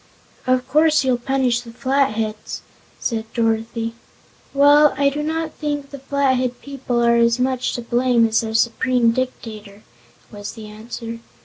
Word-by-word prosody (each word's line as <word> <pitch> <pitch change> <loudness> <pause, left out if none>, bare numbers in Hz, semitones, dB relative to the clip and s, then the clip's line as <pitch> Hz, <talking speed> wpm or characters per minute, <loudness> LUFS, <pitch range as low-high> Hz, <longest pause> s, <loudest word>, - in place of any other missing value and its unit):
"Of 255 0 +2
course 305 +2 +4
you'll 255 -2 +1
punish 250 -1 +1
the 240 - -12
Flatheads," 225 -4 -1 0.4
said 225 -2 -3
Dorothy. 225 0 -1 0.6
"Well, 290 +1 +5
I 280 0 +4
do 295 +2 -3
not 320 +1 -2
think 290 -2 -4
the 280 - -8
Flathead 260 -2 0
people 260 -4 -2
are 235 0 +4
as 235 0 +3
much 255 0 0
to 240 - -4
blame 240 -1 +3
as 220 0 +2
their 220 -1 -4
Supreme 235 +1 +2
Dictator," 220 -5 -5 0.5
was 205 -1 -7
the 220 - -10
answer. 225 +2 -7
245 Hz, 145 wpm, -21 LUFS, 230-270 Hz, 0.6 s, Well